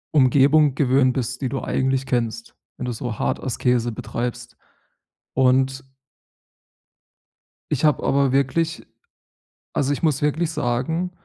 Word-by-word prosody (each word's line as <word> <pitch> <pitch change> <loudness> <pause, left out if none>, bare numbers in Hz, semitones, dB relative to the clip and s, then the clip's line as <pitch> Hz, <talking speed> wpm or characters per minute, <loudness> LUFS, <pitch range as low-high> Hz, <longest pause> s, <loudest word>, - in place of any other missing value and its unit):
Umgebung 140 +2 +4
gewöhnt 130 -2 +3
bist, 130 0 -3
die 130 - -1
du 135 0 -3
eigentlich 135 0 0
kennst, 115 -2 -2 0.2
wenn - - -5
du 125 - -2
so 115 -1 -5
hart - - -1
Askese 125 -1 0
betreibst 120 +1 -5 0.8
und 130 +1 +2 1.9
ich 150 0 0
habe 150 - +2
aber 140 -1 +2
wirklich 150 +5 0 0.9
also, 140 0 0
ich 145 - -2
muss 150 -4 +1
wirklich 155 +3 0
sagen, 160 +9 -1
130 Hz, 125 wpm, -22 LUFS, 125-145 Hz, 1.9 s, Umgebung